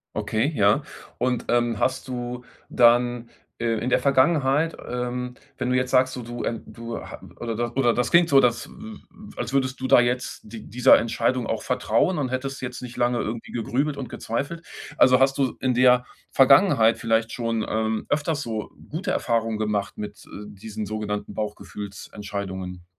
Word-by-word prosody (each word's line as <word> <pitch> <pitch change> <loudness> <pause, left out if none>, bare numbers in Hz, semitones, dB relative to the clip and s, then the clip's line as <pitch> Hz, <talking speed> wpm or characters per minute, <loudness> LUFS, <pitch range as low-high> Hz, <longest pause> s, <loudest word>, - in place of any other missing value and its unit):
Okay, 115 +8 0
ja. 105 +6 +4 0.4
Und 125 0 -1
ähm, 120 -2 +2
hast 130 +3 -1
du 125 -1 -5 0.2
dann 120 0 +3 0.3
äh, 120 - -2
in 125 - -2
der - - +3
Vergangenheit 140 +2 +2
ähm 125 0 -3 0.2
wenn 125 -1 -2
du 125 - +2
jetzt 125 0 0
sagst, 130 0 +3
du 125 - -6
du, 120 +1 -5
ähm, 115 - -3
du 115 0 -7
ha - - -10 0.2
oder 115 -2 -3
da 120 0 -1
oder 120 -4 +3
das 125 0 0
klingt 170 0 +5
so 135 -1 +7
das 120 -2 +1
w 220 0 -10
w - - -11 0.4
als 120 +1 -3
würdest 130 -2 0
du 130 - -1
da - - +7
jetzt 125 +1 -1
d 110 +1 -9
dieser 125 +4 +6
Entscheidung 120 +2 0
auch 115 - -2
vertrauen 125 +7 +1
und 135 -4 -1
hättest 135 +1 -4
jetzt 125 -1 -5
nicht 125 -1 -8
lange 120 0 +1
irgendwie 115 +1 -4
gegrübelt 140 +5 -1
und 135 - -5
gezweifelt, 140 +9 -4 0.3
also 130 0 +6
hast 135 +1 +3
du 135 -2 0
in 130 -1 +1
der 125 0 +5 0.3
Vergangenheit 135 - +5
vielleicht 115 0 0
schon, 115 -2 -1
ähm, 110 0 -1
öfters 145 0 0
so 110 -4 -4 0.2
gute 165 +5 -3
Erfahrungen 115 -2 0
gemacht 105 -2 -2
mit, 105 0 -7
äh, - - -20 0.2
diesen 105 +1 -7
sogenannten 105 0 -4
Bauchgefühlsentscheidungen? 100 -3 -6
120 Hz, 175 wpm, -24 LUFS, 115-130 Hz, 0.4 s, so